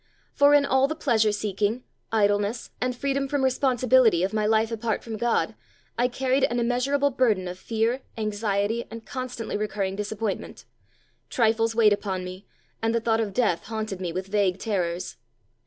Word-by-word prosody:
For 285 +1 +5
in 285 -1 +4
all 265 0 +3
the 315 - -3
pleasure 225 -9 +2
seeking, 210 +3 -1 0.3
idleness, 205 +1 +1
and 250 0 0
freedom 275 +1 -1
from 280 0 -1
responsibility 255 -6 +3
of 195 +3 -1
my 215 -1 +1
life 220 +1 +2
apart 225 -1 -2
from 225 -1 -5
God, 235 +2 0 0.4
I 245 +1 +2
carried 260 +2 0
an 240 - -1
immeasurable 265 +4 +1
burden 220 -8 +1
of 180 +1 -7
fear, 230 +5 -1 0.2
anxiety, 210 +1 -1
and 225 +1 -9
constantly 255 -5 -4
recurring 205 -2 -2
disappointment; 210 0 -4 0.6
trifles 225 -1 +2
weighed 215 -3 +5
upon 190 -3 -3
me, 185 +2 -9 0.3
and 225 +1 +1
the - - +3
thought 225 0 +1
of 210 -2 -2
death 200 -5 0
haunted 215 -4 -4
me 175 -2 -2
with 185 +3 -4
vague 195 -2 +1
terrors. 180 -4 -2
225 Hz, 165 wpm, -25 LUFS, 205-250 Hz, 0.6 s, For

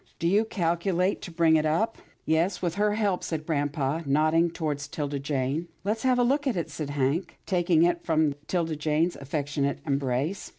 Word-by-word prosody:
" - - -33
Do 170 - -1
you 205 +5 +3
calculate 180 0 0
to - - -7
bring 165 -1 +4
it 155 - +1
up? 220 +9 0
" - - -29
" - - -40
Yes, 165 +5 +1
with 175 -3 -1
her 210 +2 +1
help," 205 -4 0
said 155 -2 -3
grampa, 145 -1 -1
nodding 155 +4 +3
toward 155 -4 -3
'Tilda 145 -1 -4
Jane. 140 +3 -1
" - - -39
Let's 215 +3 -1
have 255 -1 +3
a 245 - +4
look 280 +4 +1
at 240 -8 0
it," 170 - -3
said 150 -3 -4
Hank, 145 +5 -1
taking 175 -3 +3
it 170 0 +1
from 155 -3 +2
'Tilda 165 -3 0
Jane's 155 +3 +1
affectionate 140 0 -2
embrace. 140 +5 -1
165 Hz, 205 wpm, -27 LUFS, 145-180 Hz, -, bring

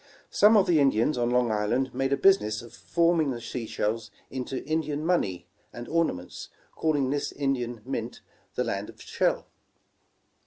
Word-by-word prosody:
Some 210 +2 +6
of 195 - +5
the 165 -3 +3
Indians 135 0 +3
on 120 -1 0
Long 125 -2 +2
Island 115 +5 0
made 135 +2 -1
a 140 - +2
business 115 - +3
of 120 - -13
forming 170 -3 +1
the 120 -3 -3
sea 115 0 -5
shells 110 +2 -2 0.2
into 130 0 -4
Indian 155 0 -2
money 95 - 0 0.3
and 120 0 -8
orna 165 - +1
ments, 90 0 -9 0.2
calling 145 -4 0
this 145 0 -1
Indian 125 -5 -2
mint, 120 -3 -4 0.3
''The - - +1
Land - - -3
of - - -14
Shell." - - -1
130 Hz, 165 wpm, -27 LUFS, 115-155 Hz, 0.3 s, Some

